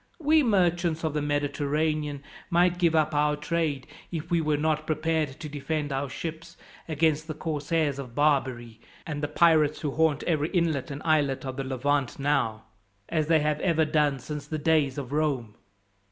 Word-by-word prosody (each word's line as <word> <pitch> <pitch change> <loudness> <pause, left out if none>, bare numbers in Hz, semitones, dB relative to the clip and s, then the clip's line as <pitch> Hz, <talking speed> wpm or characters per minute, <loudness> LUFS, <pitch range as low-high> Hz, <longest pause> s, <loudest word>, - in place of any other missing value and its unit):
We 310 0 +4
merchants 175 - +1
of 160 -2 -1
the 150 - -1
Mediterranean 145 0 -1 0.3
might 175 +1 +3
give 170 -2 +3
up 155 -1 +2
our 150 0 +2
trade, 150 -3 -2 0.3
if 165 -1 -5
we 170 -1 +3
were 150 -1 +1
not 155 0 0
prepared 155 -3 -1
to 160 - -6
defend 150 0 -3
our 135 +1 -2
ships 165 +3 -7 0.3
against 155 0 +1
the 155 - -4
corsairs 150 -2 -1
of 125 -4 -8
Barbary, 130 -6 0 0.2
and 150 -2 -4
the 145 - 0
pirates 155 -1 +3
who 150 - -1
haunt 160 -1 +1
every 155 -2 0
inlet 165 -7 0
and 140 +1 -6
islet 145 -4 +1
of 130 0 -5
the 135 - -2
Levant 135 0 -1
now, 125 -6 0 0.5
as 155 -3 0
they 160 -1 +4
have 150 0 0
ever 160 -3 +2
done 150 -2 +2
since 145 +3 -7
the 155 - -3
days 150 -3 +2
of 135 -2 -5
Rome. 140 -8 -1
150 Hz, 175 wpm, -27 LUFS, 140-160 Hz, 0.5 s, We